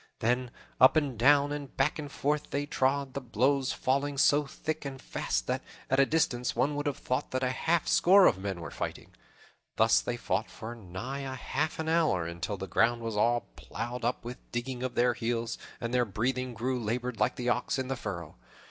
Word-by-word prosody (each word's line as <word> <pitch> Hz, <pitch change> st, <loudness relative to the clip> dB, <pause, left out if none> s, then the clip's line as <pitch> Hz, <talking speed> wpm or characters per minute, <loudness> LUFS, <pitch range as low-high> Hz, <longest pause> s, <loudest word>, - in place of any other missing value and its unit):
Then 125 Hz, +2 st, 0 dB, 0.3 s
up 130 Hz, -, +7 dB
and 145 Hz, -5 st, +1 dB
down 140 Hz, +5 st, +5 dB
and 145 Hz, -2 st, -6 dB
back 140 Hz, +4 st, +1 dB
and 145 Hz, -2 st, -6 dB
forth 150 Hz, +2 st, -1 dB
they 145 Hz, 0 st, -1 dB
trod, 140 Hz, -1 st, 0 dB
the 140 Hz, -, -3 dB
blows 130 Hz, +3 st, +1 dB
falling 140 Hz, +2 st, 0 dB
so 145 Hz, +1 st, +4 dB
thick 155 Hz, +2 st, -4 dB
and 135 Hz, -2 st, -6 dB
fast -, -, -2 dB
that, -, -, -1 dB, 0.3 s
at 135 Hz, -, +4 dB
a 135 Hz, -, +5 dB
distance, 125 Hz, -6 st, +1 dB
one 130 Hz, +5 st, +2 dB
would 145 Hz, +1 st, -2 dB
have 145 Hz, -1 st, -1 dB
thought 130 Hz, +1 st, -2 dB
that 130 Hz, 0 st, -2 dB
half 155 Hz, +6 st, +1 dB
a -, -, -2 dB
score 190 Hz, +2 st, +6 dB
of 95 Hz, -, +4 dB
men 95 Hz, -3 st, -4 dB
were 85 Hz, -, -6 dB
fighting. -, -, -5 dB, 0.6 s
Thus -, -, +4 dB
they -, -, -3 dB
fought -, -, -1 dB
for 110 Hz, +2 st, -7 dB
nigh 115 Hz, +5 st, -6 dB
a 135 Hz, -1 st, -4 dB
half 150 Hz, +4 st, -2 dB
an 160 Hz, -, -3 dB
hour, 160 Hz, -, +2 dB
until 85 Hz, +4 st, -4 dB
the 95 Hz, -, -4 dB
ground 115 Hz, +5 st, +2 dB
was 115 Hz, -2 st, -3 dB
all 120 Hz, +3 st, +3 dB
plowed 120 Hz, +1 st, -5 dB
up 120 Hz, 0 st, -1 dB
with 125 Hz, +1 st, -5 dB
the -, -, -34 dB
digging 125 Hz, 0 st, -6 dB
of 130 Hz, -1 st, -3 dB
their 120 Hz, 0 st, +3 dB
heels, 115 Hz, 0 st, -2 dB, 0.2 s
and 115 Hz, 0 st, -4 dB
their 125 Hz, -1 st, +4 dB
breathing 125 Hz, +4 st, -2 dB
grew 125 Hz, +3 st, -1 dB
labored 120 Hz, +1 st, -2 dB
like 105 Hz, -, +2 dB
the 125 Hz, 0 st, -2 dB
ox 125 Hz, +3 st, 0 dB
in 130 Hz, -1 st, -2 dB
the 135 Hz, -, -1 dB
furrow. 85 Hz, -, -6 dB
125 Hz, 210 wpm, -30 LUFS, 115-140 Hz, 0.6 s, up